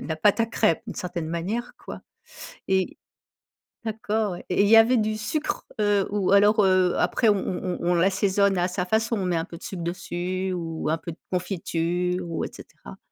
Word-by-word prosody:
la 160 - -4
pâte 205 +7 +3
à - - +4
crêpes 225 -7 +1
d'une - - -6
certaine 175 -3 -4
manière, 200 +9 -3
quoi - - -8 0.7
et 190 -1 +1 0.9
d'accord, 220 -2 -1
ouais 175 - -8
et 180 - +2
il - - +3
y 225 - +8
avait 230 +3 +6
du 215 -1 0
sucre, 300 +8 -3 0.2
heu, 205 -2 +2
ou 200 -2 0
alors, 205 +2 +5
heu, 185 -1 +3
après 230 - +1
on 205 - +5
on 185 -1 -3
on 175 - 0
on - - +4
l'assaisonne 195 +2 +2
à 175 +1 +1
sa 180 0 -2
façon, 220 +3 0
on 190 - -2
met 180 -1 0
un 165 - 0
peu 170 -2 -10
de - - -15
sucre 175 -3 -5
dessus 180 +2 -3
ou 165 -3 -4
un 160 - +1
peu 170 - -7
de 160 - -12
confiture 180 0 -1
ou 165 - -2
et - - -6
cetera? 65 - -13
185 Hz, 205 wpm, -25 LUFS, 175-210 Hz, 0.9 s, y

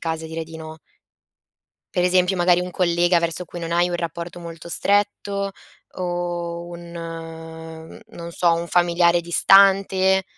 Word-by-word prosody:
casi 160 -1 -3
a - - -5
dire 160 0 -5
di 160 0 -10
no 160 0 -9 1.2
per 180 - +1
esempio 180 +1 +3
magari 175 0 +3
un 180 0 -4
collega 175 0 +2
verso 170 +1 -1
cui 175 - -9
non 165 0 -5
hai 175 +1 +2
un 175 - -2
rapporto 170 +1 -5
molto 170 0 -9
stretto 200 +1 0 0.4
o 175 -1 -4
un 170 0 -10
mhmm, 165 -1 -9
non 170 0 -9
so, 170 0 +3
un 170 +1 -3
familiare 175 0 +3
distante. 190 +1 +4
170 Hz, 150 wpm, -22 LUFS, 165-180 Hz, 1.2 s, distante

